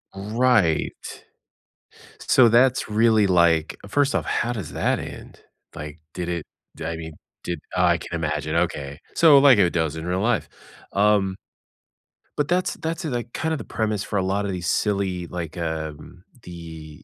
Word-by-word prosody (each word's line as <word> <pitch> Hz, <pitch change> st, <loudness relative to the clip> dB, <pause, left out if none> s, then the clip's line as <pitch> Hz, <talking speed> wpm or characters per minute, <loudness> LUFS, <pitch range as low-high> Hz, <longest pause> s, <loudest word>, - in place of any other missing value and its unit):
Right. 105 Hz, -4 st, +1 dB, 1.2 s
So 125 Hz, -3 st, +5 dB
that's 125 Hz, +1 st, +3 dB
really 110 Hz, -1 st, +4 dB
like 85 Hz, -3 st, +3 dB
First 145 Hz, +6 st, +1 dB
off, -, -, 0 dB
how 120 Hz, +1 st, -1 dB
does 100 Hz, -9 st, -6 dB
that -, -, 0 dB
end? -, -, -9 dB, 0.4 s
Like, 75 Hz, +1 st, -8 dB
did 90 Hz, -1 st, -4 dB
it 85 Hz, -3 st, -2 dB, 0.3 s
di -, -, -7 dB
I 85 Hz, -, -4 dB
mean, 80 Hz, -1 st, -7 dB, 0.3 s
did 85 Hz, -3 st, -3 dB, 0.2 s
Oh, -, -, +2 dB
I -, -, +4 dB
can -, -, -9 dB
imagine, 75 Hz, -1 st, -2 dB
okay. 75 Hz, -4 st, -1 dB, 0.2 s
So, 155 Hz, -4 st, +7 dB
like 135 Hz, -4 st, +7 dB
it 90 Hz, -4 st, +4 dB
does 80 Hz, -2 st, -1 dB
in 80 Hz, -, -6 dB
real 90 Hz, +1 st, -1 dB
life. 105 Hz, -10 st, 0 dB, 0.4 s
Um 100 Hz, -2 st, +2 dB, 1.0 s
But 150 Hz, -, +1 dB
that's 180 Hz, +2 st, 0 dB
that's, 165 Hz, +3 st, -4 dB
eh, 155 Hz, -, -2 dB
like, 120 Hz, -1 st, -4 dB
kind 160 Hz, 0 st, -2 dB
of -, -, -1 dB
the -, -, -7 dB
premise 110 Hz, -3 st, -2 dB
for 100 Hz, -, -3 dB
a -, -, +2 dB
lot 100 Hz, +2 st, -1 dB
of 100 Hz, -, -2 dB
these 90 Hz, -3 st, -4 dB
silly, 95 Hz, -4 st, 0 dB
like, 85 Hz, -1 st, -6 dB
um, 80 Hz, +1 st, -5 dB, 0.2 s
The 80 Hz, -3 st, -10 dB
95 Hz, 175 wpm, -23 LUFS, 80-115 Hz, 1.2 s, So